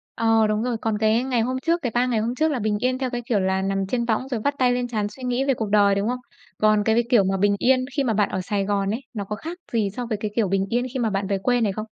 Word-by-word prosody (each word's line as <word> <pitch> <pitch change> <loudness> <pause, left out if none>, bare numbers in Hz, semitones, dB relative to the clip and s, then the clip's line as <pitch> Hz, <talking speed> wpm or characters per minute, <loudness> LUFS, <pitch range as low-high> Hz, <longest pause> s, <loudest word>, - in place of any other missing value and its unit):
Ờ, 225 -1 +3
đúng 215 +1 0
rồi. 245 -2 -1
Còn 220 -2 0
cái 220 +3 +2
ngày 250 -3 0
hôm 255 +3 -1
trước, 335 +1 +1
cái 245 - -2
3 245 +1 +3
ngày 235 -3 0
hôm 235 +3 -2
trước 315 +2 +1
là 265 - -1
bình 210 -1 0
yên 255 +2 0
theo 260 -1 -2
cái 245 -1 -3
kiểu 230 -4 +1
là 190 0 0
nằm 195 0 -1
trên 235 +2 -1
võng 235 +3 -1
rồi 245 -4 -2
vắt 285 0 0
tay 250 -1 +4
lên 245 0 -1
trán 215 -3 -1
suy 255 +5 -12
nghĩ 250 +1 0
về 275 - +2
cuộc 220 -4 -3
đời, 200 -1 +4
đúng 200 +2 0
không? 250 0 -2 0.4
Còn 215 -1 +3
cái 220 +1 +2
v - - +1
kiểu 230 -6 +5
mà 190 0 0
bình 205 +1 +2
yên 255 0 +3
khi 280 - +3
mà 235 -4 +1
bạn 205 -1 +2
ở 190 - -2
Sài 200 +1 -1
Gòn 200 -1 0
ấy, 235 - -2
nó 205 -3 -3
có 210 +2 -4
khác 330 +10 -7 0.2
gì 215 -3 +1
so 245 -1 -3
với 220 -2 -2
cái 210 -1 -2
kiểu 220 -4 +2
bình 195 +1 +1
yên 245 +2 0
khi 260 - -2
mà 225 -2 +1
bạn 195 0 -2
về 195 -1 0
quê 245 +4 +1
này 205 -3 +2
không? 215 +2 -5
225 Hz, 330 wpm, -23 LUFS, 205-250 Hz, 0.4 s, kiểu